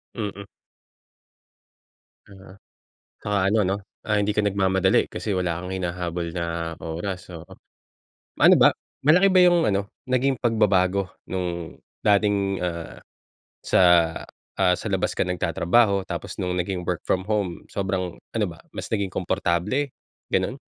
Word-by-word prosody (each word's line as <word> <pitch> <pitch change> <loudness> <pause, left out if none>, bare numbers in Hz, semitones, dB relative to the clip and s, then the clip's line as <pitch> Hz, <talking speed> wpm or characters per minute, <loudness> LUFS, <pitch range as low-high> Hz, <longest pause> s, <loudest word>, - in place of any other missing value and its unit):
Mm. 100 -3 -5 1.8
Oo, 95 -1 -14 0.7
tsaka 105 -1 -1
ano 110 +2 +2
'no, 95 +2 0 0.3
ah, 105 - +3
hindi 105 0 +1
ka 105 - +2
nagmamadali 95 -2 +2
kasi 105 - -3
wala 85 -2 -1
kang 90 - -6
hinahabol 85 -2 -3
na 85 -1 -3
oras, 90 +4 -5
oo. 85 -2 -9 1.0
Ano - - +8
ba, - - +8 0.4
malaki 180 +7 +6
ba 185 - +6
yung 175 -2 +5
ano, 100 -3 0 0.2
naging 130 +1 +1
pagbabago 100 -5 +2 0.2
nung 85 -2 -4 0.3
dating, 100 -2 +2
ah, 85 -2 -5 0.6
sa - - +3 0.8
ah, 90 - +4
sa - - -6
labas - - 0
ka - - +1
nagtatrabaho 95 +3 +2
tapos - - -6
nung 90 - -1
naging 90 0 -2
work 90 -1 -2
from 95 - +1
home, 100 -4 -2
sobrang 95 -2 -2 0.2
ano 110 -2 +2
ba, 85 -1 -10 0.2
mas - - -6
naging 100 -3 0
komportable, 90 - 0 0.4
gano'n? - - -1
95 Hz, 135 wpm, -24 LUFS, 90-105 Hz, 1.8 s, Ano